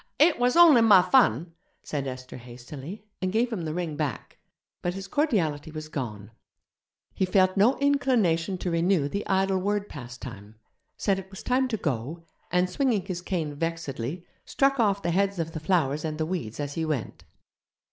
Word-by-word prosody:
'It 310 Hz, -1 st, +4 dB
was 245 Hz, 0 st, +2 dB
only 325 Hz, -8 st, +8 dB
my 210 Hz, -4 st, +8 dB
fun!' 175 Hz, -, +3 dB, 0.3 s
said 140 Hz, -2 st, -3 dB
Esther 130 Hz, -1 st, -7 dB
hastily, 130 Hz, -, -9 dB, 0.2 s
and 185 Hz, 0 st, 0 dB
gave 230 Hz, +3 st, +1 dB
him 175 Hz, -7 st, -3 dB
the 155 Hz, -, -3 dB
ring 170 Hz, -4 st, -3 dB
back, 145 Hz, -5 st, -4 dB, 0.4 s
but 175 Hz, +1 st, -2 dB
his 195 Hz, 0 st, -6 dB
cordiality 180 Hz, -, 0 dB
was 155 Hz, 0 st, -7 dB
gone. 110 Hz, -8 st, -5 dB, 0.8 s
He -, -, -1 dB
felt 185 Hz, 0 st, +3 dB
no 215 Hz, +7 st, +4 dB
inclination 230 Hz, -12 st, +2 dB
to 180 Hz, 0 st, -3 dB
renew 170 Hz, -2 st, +2 dB
the 200 Hz, +8 st, -4 dB
idle 190 Hz, 0 st, +2 dB
word 205 Hz, +2 st, -1 dB
pastime, 120 Hz, -5 st, -9 dB, 0.4 s
said 195 Hz, -2 st, +1 dB
it 190 Hz, 0 st, -10 dB
was 190 Hz, -, -10 dB
time 260 Hz, +1 st, +2 dB
to 230 Hz, -3 st, -2 dB
go, 150 Hz, -, -3 dB, 0.3 s
and, 180 Hz, +1 st, +3 dB
swinging 230 Hz, -2 st, 0 dB
his 180 Hz, -3 st, -4 dB
cane 170 Hz, -5 st, -2 dB
vexedly, 165 Hz, -1 st, -4 dB, 0.2 s
struck 275 Hz, -1 st, +1 dB
off 200 Hz, -3 st, +2 dB
the 170 Hz, -, 0 dB
heads 200 Hz, +2 st, +1 dB
of 165 Hz, -1 st, -2 dB
the 160 Hz, -, -5 dB
flowers 155 Hz, -3 st, +1 dB
and 155 Hz, -1 st, -3 dB
the 155 Hz, -, -1 dB
weeds 155 Hz, -11 st, -4 dB
as 145 Hz, -1 st, -3 dB
he 165 Hz, -, -2 dB
went. 150 Hz, -9 st, -3 dB
175 Hz, 175 wpm, -26 LUFS, 150-200 Hz, 0.8 s, only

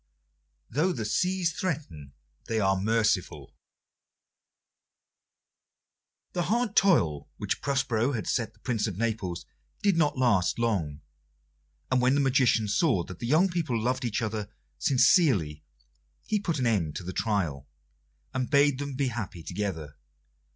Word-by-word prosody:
"Though 165 Hz, +8 st, +1 dB
the 115 Hz, -7 st, -4 dB
Seas 180 Hz, -, 0 dB
threaten, 95 Hz, -, -4 dB, 0.3 s
they 115 Hz, -2 st, 0 dB
are 95 Hz, -2 st, +2 dB
merciful" 110 Hz, 0 st, 0 dB, 2.8 s
The 175 Hz, -, -1 dB
hard 235 Hz, -1 st, 0 dB
toil 85 Hz, -, +3 dB
which -, -, -3 dB
Prospero 135 Hz, -2 st, 0 dB
had 110 Hz, -, -3 dB
set 120 Hz, -4 st, -1 dB
the -, -, -27 dB
Prince 115 Hz, -4 st, -1 dB
of 95 Hz, -4 st, -5 dB
Naples 105 Hz, -6 st, -2 dB, 0.4 s
did 200 Hz, -4 st, +3 dB
not 150 Hz, -4 st, +2 dB
last 105 Hz, -9 st, +2 dB
long, 90 Hz, -11 st, -1 dB, 0.9 s
and 130 Hz, -1 st, +3 dB
when 130 Hz, +2 st, +3 dB
the -, -, +2 dB
magician 130 Hz, -5 st, +3 dB
saw 105 Hz, -, +2 dB
that 90 Hz, +1 st, -10 dB
the 120 Hz, -, -4 dB
young 160 Hz, +8 st, +4 dB
people 165 Hz, -10 st, -1 dB
loved 130 Hz, +4 st, -1 dB
each 115 Hz, -1 st, -1 dB
other 110 Hz, -2 st, -3 dB, 0.3 s
sincerely 105 Hz, -, +3 dB, 0.6 s
he 215 Hz, -, 0 dB
put 170 Hz, -6 st, -2 dB
an 130 Hz, -, 0 dB
end 95 Hz, -10 st, 0 dB
to -, -, -5 dB
the 95 Hz, +2 st, -6 dB
trial, 85 Hz, -, -1 dB, 0.6 s
and 130 Hz, -1 st, -2 dB
bade 140 Hz, -2 st, +3 dB
them 140 Hz, -1 st, -4 dB
be 135 Hz, -1 st, 0 dB
happy 105 Hz, -8 st, -6 dB
together. 85 Hz, -6 st, -4 dB
115 Hz, 140 wpm, -28 LUFS, 95-140 Hz, 2.8 s, young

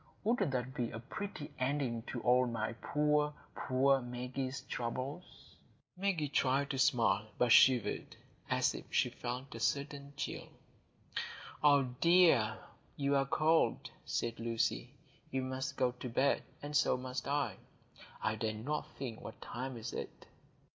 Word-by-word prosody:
Wouldn't 230 Hz, -6 st, +2 dB
that 130 Hz, -1 st, -2 dB
be 120 Hz, -2 st, -1 dB
a -, -, -6 dB
pretty 145 Hz, -, -6 dB
ending 130 Hz, -3 st, 0 dB
to 120 Hz, -, -4 dB
all 125 Hz, +1 st, +4 dB
my 115 Hz, -1 st, -2 dB
poor, 150 Hz, +4 st, +1 dB, 0.2 s
poor 135 Hz, +1 st, +2 dB
Maggie's 125 Hz, +2 st, -4 dB
troubles?" 130 Hz, +5 st, -5 dB, 0.4 s
Maggie 180 Hz, -5 st, 0 dB
tried 140 Hz, +1 st, +1 dB
to 135 Hz, -, -2 dB
smile, 115 Hz, -5 st, +3 dB
but 125 Hz, -1 st, +3 dB
shivered, 125 Hz, -1 st, +5 dB, 0.3 s
as -, -, +2 dB
if -, -, -7 dB
she -, -, +2 dB
felt 125 Hz, +2 st, -5 dB
a 115 Hz, -, -6 dB
sudden 140 Hz, +2 st, -1 dB
chill. -, -, -4 dB, 1.2 s
"Ah, 145 Hz, -2 st, +6 dB
dear, 130 Hz, -4 st, +4 dB, 0.4 s
you 140 Hz, 0 st, +1 dB
are 135 Hz, 0 st, +2 dB
cold," 160 Hz, +3 st, +2 dB
said 115 Hz, -1 st, -2 dB
Lucy. 115 Hz, 0 st, -1 dB, 0.4 s
"You 130 Hz, 0 st, -1 dB
must 130 Hz, 0 st, -3 dB
go 125 Hz, -1 st, +3 dB
to 125 Hz, +1 st, -7 dB
bed; 130 Hz, +4 st, +2 dB, 0.2 s
and 145 Hz, +1 st, -4 dB
so 145 Hz, -3 st, +4 dB
must 125 Hz, +1 st, -4 dB
I. 140 Hz, -8 st, 0 dB, 0.7 s
I 110 Hz, -, +2 dB
dare 110 Hz, -1 st, -1 dB
not 145 Hz, +8 st, -3 dB
think 120 Hz, -5 st, -5 dB
what -, -, -9 dB
time 130 Hz, +1 st, -5 dB
it 110 Hz, -, -6 dB
is." -, -, -2 dB
130 Hz, 145 wpm, -34 LUFS, 120-145 Hz, 1.2 s, Ah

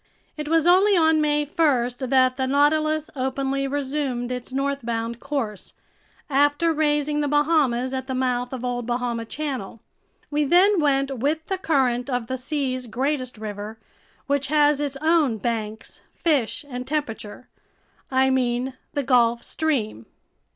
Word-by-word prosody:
It 300 Hz, -1 st, -5 dB
was 325 Hz, 0 st, +2 dB
only 380 Hz, +3 st, +5 dB
on 320 Hz, -1 st, +4 dB
May 295 Hz, 0 st, +1 dB
1 285 Hz, -5 st, +2 dB
that 260 Hz, -1 st, +3 dB
the 260 Hz, 0 st, -1 dB
Nautilus 310 Hz, +2 st, +2 dB
openly 270 Hz, +1 st, -1 dB
resumed 270 Hz, -3 st, -2 dB
its 250 Hz, 0 st, -5 dB
northbound 235 Hz, -4 st, -2 dB
course, 265 Hz, -8 st, -4 dB, 0.5 s
after 290 Hz, +3 st, +2 dB
raising 295 Hz, -1 st, +1 dB
the 290 Hz, -, 0 dB
Bahamas 285 Hz, -4 st, +2 dB
at 260 Hz, 0 st, -3 dB
the 260 Hz, -, -3 dB
mouth 250 Hz, -1 st, -1 dB
of 255 Hz, -2 st, -5 dB
Old 245 Hz, -1 st, -3 dB
Bahama 240 Hz, -1 st, -2 dB
Channel. 260 Hz, -5 st, -5 dB, 0.5 s
We 295 Hz, 0 st, +1 dB
then 365 Hz, +6 st, +4 dB
went 275 Hz, -3 st, +1 dB
with 310 Hz, +5 st, 0 dB
the 385 Hz, -1 st, -3 dB
current 265 Hz, -8 st, +1 dB
of 245 Hz, -3 st, -1 dB
the 260 Hz, +3 st, -3 dB
sea's 255 Hz, -2 st, -3 dB
greatest 255 Hz, +1 st, -2 dB
river, 210 Hz, 0 st, -6 dB, 0.5 s
which 280 Hz, 0 st, 0 dB
has 295 Hz, 0 st, +3 dB
its 280 Hz, -2 st, -3 dB
own 315 Hz, -8 st, +3 dB
banks, 220 Hz, -1 st, -4 dB
fish, 290 Hz, -4 st, 0 dB
and 250 Hz, -2 st, -6 dB
temperature. 250 Hz, -6 st, -4 dB, 0.6 s
I 265 Hz, 0 st, +3 dB
mean 255 Hz, 0 st, 0 dB, 0.2 s
the 285 Hz, -, 0 dB
Gulf 240 Hz, -2 st, +3 dB
Stream. 240 Hz, -, -2 dB
270 Hz, 145 wpm, -23 LUFS, 245-295 Hz, 0.6 s, only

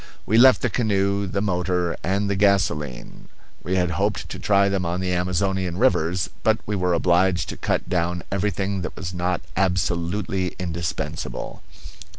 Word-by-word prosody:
We 110 Hz, +2 st, +3 dB
left 130 Hz, +1 st, +7 dB
the 125 Hz, -, +2 dB
canoe, 100 Hz, -2 st, +1 dB
the 100 Hz, +2 st, -2 dB
motor, 90 Hz, -2 st, 0 dB
and 100 Hz, +3 st, 0 dB
the 100 Hz, -, 0 dB
gasolene; 95 Hz, -10 st, 0 dB, 0.3 s
we 95 Hz, -, -2 dB
had 90 Hz, -2 st, +1 dB
hoped 100 Hz, +5 st, -1 dB
to -, -, -6 dB
try 100 Hz, -1 st, +3 dB
them 100 Hz, -2 st, 0 dB
on 85 Hz, +1 st, -2 dB
the 90 Hz, -1 st, -1 dB
Amazonian 90 Hz, 0 st, -1 dB
rivers, 90 Hz, -6 st, +2 dB
but 110 Hz, 0 st, +3 dB
we 105 Hz, -, -2 dB
were 90 Hz, -2 st, +1 dB
obliged 90 Hz, +2 st, +2 dB
to -, -, -4 dB
cut -, -, -1 dB
down 90 Hz, 0 st, -1 dB
everything 100 Hz, 0 st, -1 dB
that 90 Hz, -, -5 dB
was 90 Hz, 0 st, -5 dB
not 90 Hz, 0 st, -1 dB
absolutely 90 Hz, +1 st, 0 dB
indispensable. 80 Hz, -3 st, -4 dB
95 Hz, 160 wpm, -23 LUFS, 90-100 Hz, 0.3 s, left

